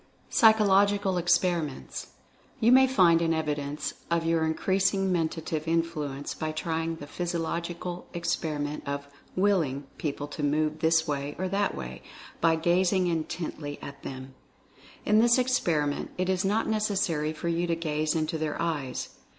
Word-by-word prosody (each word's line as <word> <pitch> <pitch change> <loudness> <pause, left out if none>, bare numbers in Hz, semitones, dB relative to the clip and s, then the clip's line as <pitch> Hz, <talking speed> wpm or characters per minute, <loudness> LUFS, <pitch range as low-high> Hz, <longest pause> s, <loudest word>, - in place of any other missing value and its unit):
PSYCHOLOGICAL 200 -3 +4
EXPERIMENTS. 175 -4 0 0.5
You 235 0 +4
may 265 +1 +7
find 175 -10 +5
an 165 -1 +2
evidence 150 -1 -2 0.2
of 170 -1 +1
your 165 -1 +2
increasing 190 +3 +1
Men 165 -3 +2
tative 160 -1 -4
Influence 155 -4 -1
by 155 0 -3
trying 165 +1 -2
the 145 - -9
psychological 170 +2 -4
experiment 150 -3 -2
of 140 0 -3 0.3
"Willing" 175 -9 +1 0.2
people 145 -1 -3
to 150 - -6
move 155 +1 +1
this 160 0 +3
way 145 0 -2
or 185 - -1
that 200 +1 0
way, 65 -1 -7 0.4
by 165 -1 +4
gazing 180 +3 +2
intently 160 -3 -3
at 140 - -9
them. 130 0 -8 0.7
In 210 +1 +4
this 235 +2 +5
experiment 170 - +1
it 185 0 0
is 190 0 +1
not 210 +3 +1
necessary 190 -8 0
for 160 +2 -5
you 170 +1 0
to 170 - +1
gaze 155 -1 -1
into 160 0 -1
their 155 -1 -2
eyes. 155 -6 -2
165 Hz, 145 wpm, -28 LUFS, 150-185 Hz, 0.7 s, may